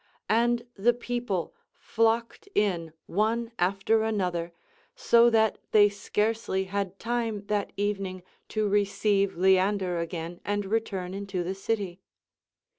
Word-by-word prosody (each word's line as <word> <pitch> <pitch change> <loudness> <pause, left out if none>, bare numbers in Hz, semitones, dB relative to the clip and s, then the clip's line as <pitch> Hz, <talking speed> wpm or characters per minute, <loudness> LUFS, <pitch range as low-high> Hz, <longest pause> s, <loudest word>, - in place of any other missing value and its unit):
And 235 +1 +2
the 235 +3 +2
people 240 -7 -3 0.3
fiocked 230 - 0
in 175 -6 +1
one 225 +4 0
after 195 +5 +2
another, 180 -6 -1 0.4
so 235 0 +5
that 220 -1 +2
thev 205 -1 +6
scarcely 210 -1 -1
had 195 -1 -3
rime 230 -4 -1
that 205 -1 -1
eveniuii 195 -3 -2 0.2
to 215 -1 0
receive 200 -1 +1
Lean 190 +2 +4
der 180 -3 -2
again 170 0 -5
and 205 +1 -1
return 195 -3 -2
into 195 -2 -3
the 180 +2 -2
city. 195 -2 -3
200 Hz, 120 wpm, -27 LUFS, 190-225 Hz, 0.4 s, thev